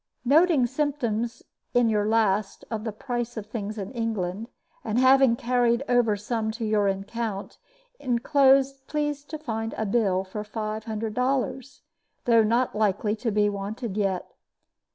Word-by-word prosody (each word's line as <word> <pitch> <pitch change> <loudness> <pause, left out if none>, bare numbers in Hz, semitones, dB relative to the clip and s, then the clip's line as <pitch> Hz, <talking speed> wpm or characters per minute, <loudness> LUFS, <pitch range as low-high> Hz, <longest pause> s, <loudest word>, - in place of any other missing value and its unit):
"Noting 300 0 +5
symptoms 240 -4 -2 0.3
in 245 -1 +5
your 210 -2 +1
last 215 -2 +1
of 220 -1 -3
the 220 - -2
price 240 +1 -4
of 215 - -4
things 215 -1 -5
in 195 -1 -5
England, 220 -4 -3 0.4
and 220 0 -2
having 260 -1 +5
carried 240 +1 +1
over 240 -4 +3
some 220 +1 -2
to 225 0 -4
your 210 -2 +2
account, 200 +1 -3 0.4
inclosed 270 +1 +3
please 295 -1 -2
to 310 - -6
find 225 -6 -4
a 220 - -1
bill 195 -3 +1
for 200 +2 -6
five 215 0 -4
hundred 220 -1 -3
dollars, 260 +2 -1 0.4
though 230 -2 +5
not 235 +4 +1
likely 210 0 +1
to 230 +1 -2
be 210 -1 +2
wanted 205 +2 -4
yet. 195 -3 0
225 Hz, 150 wpm, -26 LUFS, 210-250 Hz, 0.4 s, Noting